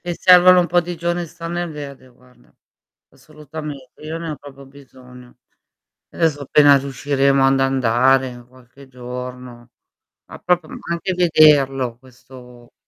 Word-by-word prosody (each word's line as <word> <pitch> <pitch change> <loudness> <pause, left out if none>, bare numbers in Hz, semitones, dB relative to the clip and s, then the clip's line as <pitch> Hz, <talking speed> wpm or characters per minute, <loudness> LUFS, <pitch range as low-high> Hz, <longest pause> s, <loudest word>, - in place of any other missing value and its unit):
E 175 -1 -5
servono 180 +1 +6
un 175 - -1
po' 175 +2 +2
di 175 0 -7
giorni 175 +1 -3
a - - -7
star 165 +1 -9
nel 175 -1 -4
verde, 140 -3 -10
guarda. 125 0 -26 0.6
Assolutamente, 150 -3 -11
io 155 +2 -6
ne 165 -1 -6
ho 150 - -6
proprio 140 -1 -14
bisogno. 130 -2 -17 0.7
Adesso, 155 -4 -1
appena 145 +1 +4
riusciremo 135 0 0
ad 135 0 +2
andare 130 -1 +1
qualche 130 +2 -19
giorno, 125 -1 -10 0.6
ma - - -13
proprio 175 -3 -1 0.2
anche 170 +2 -3
vederlo 145 -8 +3
questo 125 -1 -17
140 Hz, 135 wpm, -19 LUFS, 125-160 Hz, 0.7 s, servono